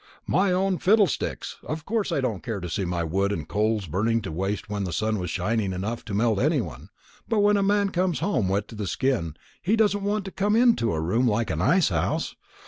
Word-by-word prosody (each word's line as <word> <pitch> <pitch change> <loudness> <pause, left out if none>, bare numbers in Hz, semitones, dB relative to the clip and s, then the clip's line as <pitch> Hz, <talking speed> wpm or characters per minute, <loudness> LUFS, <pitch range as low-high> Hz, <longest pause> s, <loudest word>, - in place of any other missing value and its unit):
"My 190 +2 +2
own 185 0 +1
fiddlesticks! 205 -4 +1
Of 155 0 -5
course 215 -3 -1
I 145 - +1
didn't 115 -7 -2
care 115 -5 -4
to 90 - -5
see 95 - -1
my 85 -1 -1
wood 95 +5 0
and 80 -7 -3
coals 105 +1 0
burning 110 +7 0
to - - -5
waste 95 +6 -2
when 105 -1 -3
the 90 - -3
sun 110 +4 0
was 90 -2 -3
shining 100 +2 -1
enough 105 +6 -4
to 100 - -4
melt 110 -1 +2
any 150 +4 +2
one. 80 - -7 0.4
But 220 -3 +2
when 205 0 +4
a 200 - +2
man 200 0 +2
comes 180 -1 0
home 125 - 0
wet 100 +2 0
to - - -9
the 105 -2 -4
skin, 115 - -1 0.3
he 200 +6 +2
doesn't 205 -2 +2
want 205 0 -1
to 195 - -6
come 205 +3 +1
into 230 - +4
a 80 - -1
room 110 +11 +1
like 115 0 0
an 80 - -2
ice 175 - +4
house. 85 -5 -1
115 Hz, 230 wpm, -25 LUFS, -, 0.4 s, when